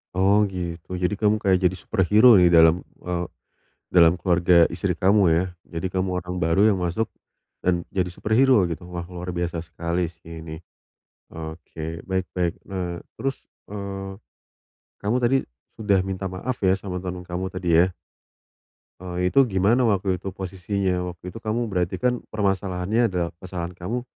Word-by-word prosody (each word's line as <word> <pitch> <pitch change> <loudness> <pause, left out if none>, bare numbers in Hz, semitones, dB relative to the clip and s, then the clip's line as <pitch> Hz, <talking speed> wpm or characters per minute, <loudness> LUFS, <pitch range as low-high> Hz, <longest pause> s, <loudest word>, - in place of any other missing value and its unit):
Oh 100 +3 +4
gitu. 90 -1 -5
Jadi 90 +2 0
kamu 105 +1 +2
kayak 95 -4 +2
jadi 95 - -7
superhero 105 +4 +5
ya 90 - +6
dalam, 80 0 +6 0.2
eee, 90 -1 -2 0.7
dalam 85 -1 +6
keluarga 90 -1 +4
istri 90 +1 -1
kamu 95 +2 +4
ya? 85 +2 +3 0.2
Jadi 90 +2 -4
kamu 95 0 0 0.2
orang 90 0 -4
baru 85 +6 +4
yang 95 - -1
masuk, 90 +5 -1 0.5
dan 90 -1 0
jadi 95 -2 0
superhero 110 +4 +3
gitu. 85 +2 -6
Wah, 85 -1 -5
luar 90 0 -5
biasa 85 -1 -2
sekali 85 +1 -2
sih 85 0 -11
ini. 80 -1 -7 0.7
Oke, 80 0 -7
baik 95 -1 -1
baik, 90 -2 +1
eee, 90 -3 -4 0.2
terus, 135 0 -4 0.2
eee, 95 -1 -6 0.8
kamu 105 +5 +1
tadi, 125 +2 +3 0.4
sudah 100 -4 +1
minta 95 0 -3
maaf 110 +8 -4
ya 95 -1 +3
sama 90 -2 -5
teman 90 -1 -6
kamu 90 +1 -3
tadi 85 -3 +2
ya? 95 - +2 1.1
Eee, 90 0 -2
itu 135 -2 +5
gimana 110 +5 +3
waktu 95 -3 +1
itu 95 - -8
posisinya? 95 0 -2 0.2
Waktu 90 +2 -9
itu 115 - -9
kamu 115 +1 -2
berarti 90 -2 0
kan, 125 -1 0
permasalahannya 100 +2 0
adalah 90 -4 -2
kesalahan 90 -2 -5
kamu, 95 +8 -4
90 Hz, 155 wpm, -24 LUFS, 85-100 Hz, 1.1 s, ya